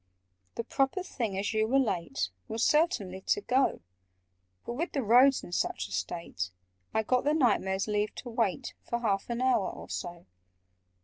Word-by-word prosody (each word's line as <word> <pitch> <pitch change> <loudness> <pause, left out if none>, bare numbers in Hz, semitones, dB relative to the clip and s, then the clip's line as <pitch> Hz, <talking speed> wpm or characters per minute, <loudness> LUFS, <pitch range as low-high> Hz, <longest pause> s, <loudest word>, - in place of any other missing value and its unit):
"The 230 - -2
proper 270 - 0
thing, 230 - -3
as 200 +3 -1
you 220 0 +2
were 265 +4 +3
late, 180 - 0 0.2
Was 225 +1 -1
certainly 205 - +2
to 415 - +2
go: 265 -6 +2 0.8
But, - - -3
with 330 +9 -3
the 275 - 0
roads 250 +5 +6
in - - -9
such 95 - -1
a - - -15
state, 95 - -3 0.4
I 220 - +1
got 250 +3 +2
the 295 +2 +2
Knight 245 -9 +4
Mayor's 190 +1 -1
leave 210 0 0
to 245 - -7
wait 230 +1 -1
For 235 0 -3
half 200 -3 0
an 235 +1 -1
hour 250 -7 +3
or - - -9
so." 175 -1 -5
225 Hz, 180 wpm, -30 LUFS, 190-260 Hz, 0.8 s, roads